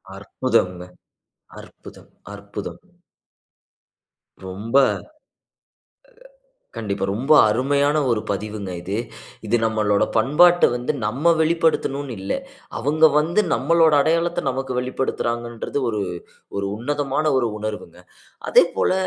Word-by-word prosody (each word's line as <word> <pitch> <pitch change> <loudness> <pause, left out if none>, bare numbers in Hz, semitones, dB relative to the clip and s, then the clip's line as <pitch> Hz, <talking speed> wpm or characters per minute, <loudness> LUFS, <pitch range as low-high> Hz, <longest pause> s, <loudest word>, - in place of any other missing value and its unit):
அற்புதம்ங்க! 95 -3 -1 0.8
அற்புதம்! - - -15 0.2
அற்புதம்! 100 0 -8 1.7
ரொம்ப 105 +7 -2 2.0
கண்டிப்பா, 100 -3 -3
ரொம்ப 135 +8 +1 0.2
அருமையான 140 +6 +1
ஒரு 110 -2 +1
பதிவுங்க 100 -1 -4
இது. 95 +3 -5 0.5
இது 120 +3 +2
நம்மளோட 110 -2 +1
பண்பாட்ட 170 +10 +5
வந்து 125 +4 -2
நம்ம 145 +10 +2
வெளிப்படுத்தணும்னு 160 -5 0
இல்ல. 95 - -3 0.5
அவுங்க 150 +6 +1
வந்து 165 +7 +2
நம்மளோட 165 +3 +3
அடையாளத்த, 170 +2 0
நமக்கு 130 0 -4
வெளிப்படுத்துறாங்கன்றது, 120 -1 -3
ஒரு 105 -2 -2 0.6
ஒரு 100 - -2
உன்னதமான 145 +4 -2
ஒரு 120 -3 0
உணர்வுங்க. 105 0 -6 0.5
அதேபோல - - +3
125 Hz, 90 wpm, -21 LUFS, 105-150 Hz, 2.0 s, பண்பாட்ட